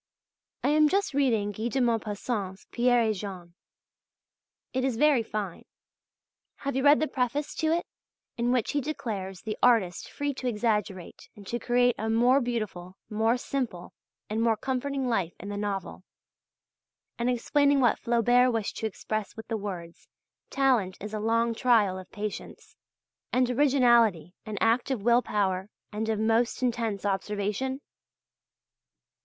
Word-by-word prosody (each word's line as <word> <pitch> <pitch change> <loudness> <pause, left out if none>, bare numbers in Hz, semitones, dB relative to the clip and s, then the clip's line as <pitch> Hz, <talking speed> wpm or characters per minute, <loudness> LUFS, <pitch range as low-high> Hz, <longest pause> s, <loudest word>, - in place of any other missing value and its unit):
I - - +2
am 305 0 +5
just 395 -3 0
reading 230 -7 +1
Guy 220 +3 -3
de 265 +3 -1
Maupassant's 215 -4 -2
"Pierre 245 0 +3
et 220 - +2
Jean." 185 -4 -7 1.2
It 260 0 0
is 260 -4 0
very 295 -2 +4
fine. 210 -5 -5 1.0
Have 275 - -1
you 265 - +1
read 290 +1 +6
the 310 - +1
preface 280 +2 -2
to 315 - 0
it, 340 +1 0 0.5
in 240 +1 0
which 250 -3 +1
he 290 - 0
declares 205 -10 -5
the 215 -1 -4
artist 225 -8 +3
free 285 0 -2
to 255 -1 -5
exaggerate 210 -5 -2
and 205 - -13
to 240 +4 -3
create 245 0 +3
a 220 +1 -2
more 245 +5 +4
beautiful, 210 -7 -4
more 225 +3 +2
simple, 245 -9 -4 0.3
and 220 +2 -2
more 230 -1 +2
comforting 265 +2 -2
life 195 -8 -1
in 200 - -7
the 205 - -4
novel, 200 -3 -4 1.2
and 240 +1 +1
explaining 280 +3 +2
what 240 -4 +3
Flaubert 245 +1 +3
wished 225 -3 -2
to 220 - -1
express 215 0 -4
with 220 - -8
the 225 - -1
words, 180 -5 -7 0.4
"talent 250 -9 +1
is 210 +2 -7
a 215 - -2
long 230 +2 +1
trial 220 -6 +3
of 185 - -12
patience," 210 0 -7 0.6
and 250 -1 +2
originality 240 - +3
an 215 -1 -4
act 230 +3 +2
of 250 -7 -2
will 240 +2 +5
power 190 -3 -1 0.2
and 220 +1 -3
of 220 -1 0
most 225 +3 +1
intense 230 -5 -1
observation? 210 +6 -2
230 Hz, 150 wpm, -28 LUFS, 205-250 Hz, 1.2 s, read